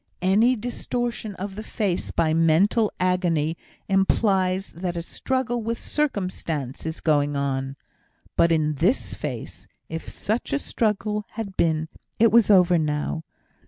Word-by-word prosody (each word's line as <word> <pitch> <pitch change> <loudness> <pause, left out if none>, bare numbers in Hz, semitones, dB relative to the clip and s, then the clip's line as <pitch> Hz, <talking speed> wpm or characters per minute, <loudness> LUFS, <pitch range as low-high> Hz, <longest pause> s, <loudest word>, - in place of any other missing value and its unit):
Any 215 +7 +4
distortion 240 -2 -3
of 195 +2 -5
the 215 - -5
face 205 -4 -2
by 160 -1 +1
mental 170 +7 +3
agony 175 -4 +1 0.3
implies 195 -1 +2
that 175 0 -4
a 170 - -3
struggle 245 +4 -2
with 230 +1 -2
circumstance 180 - -2
is 160 - -5
going 145 -2 +2
on. 135 -1 -1 0.6
But 170 - +4
in 155 -2 +2
this 175 - +1
face, - - -6 0.2
if 165 0 -5
such 220 +6 -2
struggle 210 -4 -1
had 210 -4 -5
been, 160 -1 +1 0.3
it 230 0 +5
was 230 -2 +5
over 180 -3 +6
now. 150 +1 -1
185 Hz, 130 wpm, -24 LUFS, 160-215 Hz, 0.6 s, over